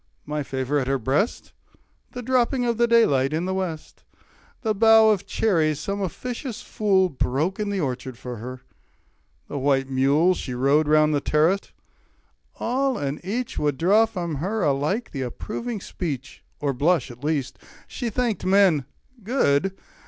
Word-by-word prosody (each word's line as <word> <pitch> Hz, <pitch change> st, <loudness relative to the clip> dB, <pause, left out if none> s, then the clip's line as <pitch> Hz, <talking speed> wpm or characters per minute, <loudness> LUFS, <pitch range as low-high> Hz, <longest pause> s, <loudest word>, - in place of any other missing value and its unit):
My 150 Hz, 0 st, -3 dB
favour 135 Hz, +1 st, -1 dB
at 130 Hz, -, -2 dB
her 135 Hz, 0 st, +1 dB
breast, 135 Hz, -, -1 dB, 0.6 s
The 245 Hz, -, -6 dB
dropping 250 Hz, +1 st, +1 dB
of 235 Hz, -1 st, -1 dB
the 235 Hz, -, +4 dB
daylight 145 Hz, -, +3 dB
in 165 Hz, +3 st, -1 dB
the 190 Hz, -, -1 dB
West, 180 Hz, -5 st, -5 dB, 0.6 s
The 220 Hz, -2 st, +1 dB
bough 220 Hz, +1 st, +6 dB
of 200 Hz, -3 st, -1 dB
cherries 160 Hz, -8 st, +1 dB
some 200 Hz, 0 st, -3 dB
officious 245 Hz, -, -5 dB
fool 195 Hz, -3 st, +2 dB
Broke 155 Hz, -, -1 dB
in 210 Hz, -1 st, -1 dB
the 200 Hz, -2 st, -1 dB
orchard 130 Hz, -3 st, -4 dB
for 125 Hz, -1 st, -7 dB
her, 125 Hz, +3 st, -8 dB, 0.9 s
the 145 Hz, -, -4 dB
white 135 Hz, -1 st, +1 dB
mule 140 Hz, +7 st, +3 dB
She 130 Hz, -8 st, -5 dB
rode 140 Hz, +4 st, +3 dB
with 150 Hz, -, +2 dB
round 155 Hz, 0 st, +4 dB
the 145 Hz, -, +1 dB
terrace 160 Hz, +8 st, +1 dB, 0.8 s
all 265 Hz, +2 st, 0 dB
and 140 Hz, +3 st, -4 dB
each 230 Hz, +6 st, -3 dB
Would 145 Hz, -2 st, 0 dB
draw 205 Hz, +7 st, +4 dB
from 170 Hz, -8 st, -4 dB
her 200 Hz, +9 st, -2 dB
alike 150 Hz, -, 0 dB
the 135 Hz, -, -4 dB
approving 215 Hz, -, -4 dB
speech, 145 Hz, -8 st, -6 dB, 0.2 s
30 -, -, -4 dB
Or 140 Hz, -, +1 dB
blush, 145 Hz, 0 st, +1 dB
at 120 Hz, +3 st, -14 dB
least. 145 Hz, -4 st, -2 dB, 0.3 s
She 240 Hz, -, -4 dB
thanked 235 Hz, -1 st, -1 dB
men 185 Hz, -7 st, +4 dB, 0.4 s
good! 195 Hz, -, +1 dB
165 Hz, 165 wpm, -24 LUFS, 140-215 Hz, 0.9 s, bough